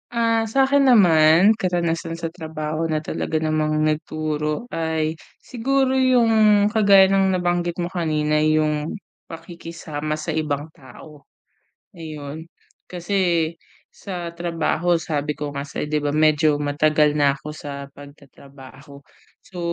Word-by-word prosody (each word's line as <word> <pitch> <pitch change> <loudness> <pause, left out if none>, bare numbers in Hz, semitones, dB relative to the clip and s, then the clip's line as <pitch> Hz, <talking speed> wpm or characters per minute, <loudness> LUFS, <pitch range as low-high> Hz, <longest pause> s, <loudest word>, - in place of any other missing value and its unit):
Ah 230 -1 +1
sakin 270 +4 +3
naman, 175 -1 +5
karanasan 170 -3 -2
sa 165 - -3
trabaho 160 -2 -5
na 160 -1 -1
talaga 155 0 -3
namang 155 -1 0
nagturo 155 +3 -2
ay 160 -5 -2 0.2
siguro 265 +2 -1
yung 225 -5 +4
kagaya 200 -3 +5
ng 195 0 +2
nabanggit 175 0 -1
mo 175 - -1
kanina 155 -4 -1
yung 155 +3 0 0.3
pakikisama 165 -2 -6
sa 155 0 -4
ibang 150 -1 -2
tao. 140 +3 -15 0.7
Ayun, 155 -1 -8 0.4
kasi, 180 +3 -4 0.8
sa 175 -3 -7
trabaho 170 0 0
sabi 150 -2 -2
ko 150 -1 -4
nga 140 0 -4
sayo 145 +1 -5
di 150 0 -1
ba 145 - -1
medyo 155 0 +2
matagal 150 +1 +2
na 145 -2 +3
ako 140 +2 -9
sa 140 -2 -7
pag-tatrabaho. 140 0 -15 0.4
So, 180 - -13
160 Hz, 120 wpm, -21 LUFS, 150-180 Hz, 0.8 s, naman